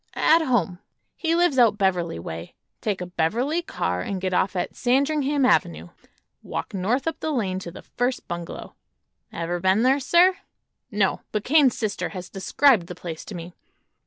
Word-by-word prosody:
"At 325 +2 +4
home. 195 - 0 0.4
He 330 -1 0
lives 345 -6 +3
out 225 -4 +5
Beverly 180 - 0
way. 85 0 -7 0.3
Take 205 -4 -2
a - - -3
Beverly 235 - 0
car 90 - -2
and 195 - -3
get 185 0 -2
off 185 +1 +1
at 180 - -3
Sandringham 280 +2 +1
avenue. 85 - +1 0.5
Walk - - -5
north 210 +8 0
up 325 -2 -2
the 315 - -3
lane 200 -10 -1
to 180 - -7
the 170 - -11
first 250 +1 -2
bungalow." 175 -1 -6 0.6
"Ever 170 +1 -3
been 190 +5 +2
there, 265 +3 +4
sir?" 355 +6 +4 0.5
"No; 205 -4 0
but 210 -1 -2
Kane's 280 -2 +4
sister 215 -3 -2
has 185 -2 -8
described 200 +1 +3
the 180 - -7
place 165 -2 -7
to 205 - -8
me. 170 +1 -8
205 Hz, 170 wpm, -24 LUFS, 180-270 Hz, 0.6 s, out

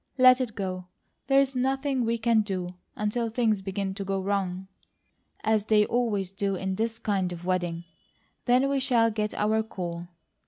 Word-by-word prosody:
Let 255 0 +7
it 235 -4 -3
go! 185 -3 -4 0.4
There's 270 0 +3
nothing 265 0 0
we 230 +1 +1
can 225 -1 +3
do, 185 -4 -3 0.2
until 225 +2 -1
things 220 -3 +1
begin 195 0 -3
to 200 +1 -5
go 195 0 -1
WRONG, 190 -1 -2 0.8
as 215 -1 +2
they 210 -1 +4
always 210 -6 0
do 195 0 -1
in 190 +1 -2
this 225 +3 -2
kind 195 -5 -1
of 175 0 -7
wedding; 175 -2 -1 0.6
then 250 +2 +4
we 275 0 +1
shall 235 -4 +3
get 210 -1 -2
our 215 +1 +2
call. 175 -5 -5
210 Hz, 165 wpm, -27 LUFS, 190-235 Hz, 0.8 s, Let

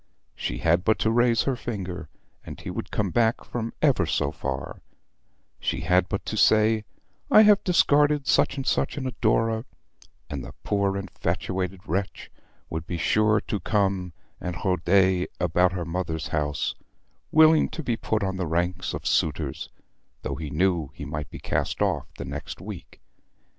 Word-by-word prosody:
She - - -4
had 85 +6 +2
but 110 +2 +3
to 110 - +1
raise 120 0 +3
her 135 - 0
finger, 95 -9 -5 0.3
and - - -9
he - - -6
would - - -5
come 100 -3 -1
back 115 +1 +2
from 115 -1 -4
ever 130 - +3
so - - 0
far; 65 0 -5 0.8
she - - -2
had 90 +2 +2
but - - -3
to - - -3
say 110 0 +4 0.4
I 215 - +8
have 210 -1 +5
discarded 150 -4 +3
such 135 - +2
and 135 - -3
such - - 0
an 135 - -3
adorer, 115 -2 +1 0.6
and 70 -4 -5
the - - -9
poor 100 -1 0
infatuated 95 -1 -3
wretch 95 +4 -3 0.4
would 80 +1 -5
be 85 - -3
sure 105 +4 +3
to 105 - -3
come 95 -5 0 0.3
and 90 -1 -4
roder 95 0 +3
about 90 +1 +2
her 90 -2 -3
mother's 85 -2 -3
house, 75 -1 -1 0.6
willing 160 0 +6
to 160 - -6
be 120 -4 0
put 110 -1 -1
on 95 -1 -2
the 90 -2 -2
ranks 85 +3 -1
of - - -7
suitors, 75 -3 0 0.5
though - - -2
he 80 -2 -5
knew 85 -1 +1
he 70 - -7
might 75 +1 -5
be - - -8
cast - - -2
off - - 0
the 70 - -5
next 70 +2 -6
week. - - -9
95 Hz, 165 wpm, -25 LUFS, 85-110 Hz, 0.8 s, I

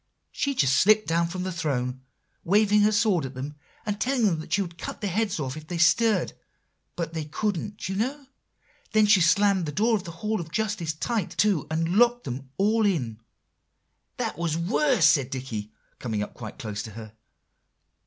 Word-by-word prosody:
She 280 -1 -1
just 135 - +3
slipped 215 +2 +5
down 170 +1 +1
from 180 +2 -4
the 185 - -3
throne, 130 -6 -2 0.4
waving 210 +3 +4
her 210 +1 +4
sword 205 -6 +2
at 135 0 -6
them, 135 +3 -5 0.3
and 205 -1 -3
telling 230 -10 +2
them 155 - -8
she 200 - +2
would 170 -2 -10
cut - - -6
their 200 -3 -2
heads 205 -2 0
off 135 -2 -3
if 155 0 -10
they 175 - -4
stirred; 220 +6 +3 0.6
but 170 -1 -4
they 160 -2 -3
couldn't, 200 +5 -3
you 190 - -3
know; 270 +7 -2 0.7
then 215 -1 +5
she 205 -2 +5
slammed 190 +1 +3
the - - -2
door 220 +9 +2
of 200 - -2
the - - -8 0.2
Hall 215 -2 0
of 165 -1 -9
Justice 205 -6 -1
tight 205 +4 -3
to, 200 -8 +2
and 165 +4 0
locked 240 +1 +4
them 130 +1 -6
all 215 +3 +2
in." 130 - 0 1.0
"That - - -3
was 165 -2 -1
worse," 210 - +2
said 145 -5 +4
Dicky, 120 -6 -5 0.3
coming 110 -4 -2
up - - -8
quite 110 -3 -9
close 110 -4 -5
to 110 - -8
her. 110 0 -9
175 Hz, 190 wpm, -26 LUFS, 150-210 Hz, 1.0 s, slipped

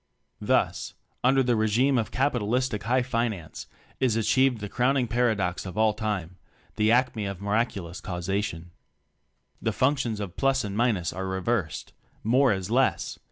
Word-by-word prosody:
Thus, - - 0 0.3
under 135 +1 +4
the 120 -1 +2
regime 120 +5 +2
of 110 - -2
capitalis 125 -1 +1
tic 105 -5 -5
"High 125 +2 +2
Finance," 115 -9 -3 0.3
is 125 -4 +2
achieved 120 +3 +2
the 105 - -5
crowning 125 +3 +1
paradox 110 -6 0
of 95 0 -8
all 110 -1 +3
time 105 -5 -3 0.4
the 110 0 +3
acme 120 -4 +2
of 100 -2 -5
miraculous 100 -4 -2
causation: 90 -2 -3 0.9
The - - 0
functions 130 -5 0
of 100 -4 -6
plus 135 -1 +2
and 100 -1 -4
minus 110 -7 +1
are 95 +2 -4
reversed; 95 -2 -2 0.3
more 125 +4 +4
is 95 -2 -2
less! - - +1
110 Hz, 150 wpm, -26 LUFS, 100-125 Hz, 0.9 s, under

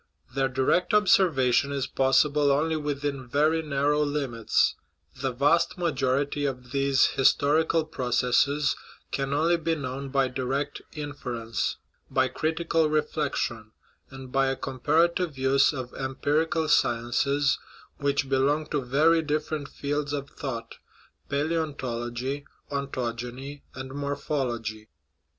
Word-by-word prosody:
Their 135 0 +1
direct 135 - +2
observation 145 - +4
is 140 -2 -1
possible 145 +2 +3
only 155 +3 +1
within 145 -3 -3
very 155 +5 +2
narrow 145 0 +1
limits; 140 -6 +1 0.4
the 135 -1 -2
vast 145 +9 +2
majority 145 -3 0
of 125 -3 -3
these 140 -1 +3
historical 155 +4 +3
processes 130 +1 +1 0.4
can 135 0 -2
only 165 +4 +3
be 165 0 0
known 135 -1 -5
by 135 -1 +2
direct 130 +2 -2
in 145 -2 -5
ference 115 -5 -3 0.3
by 130 -1 +2
critical 160 +1 0
reflection, 145 -7 -1 0.4
and 135 -1 -10
by 135 +1 +2
a 135 - 0
comparative 155 +5 +1
use 135 +1 +4
of 130 -4 -6
empirical 155 +5 0
sciences 135 +2 +2 0.4
which 140 -1 0
belong 140 +3 +2
to 145 - +1
very 155 +6 +3
different 150 -1 -2
fields 145 +1 -3
of 140 -1 -4
thought, 115 -5 -6 0.5
palaeontology, 140 -4 -2 0.3
ontogeny, 130 0 -4
and 130 0 -7
mor 140 0 -2
phology. 120 -7 -3
140 Hz, 115 wpm, -27 LUFS, 130-150 Hz, 0.5 s, observation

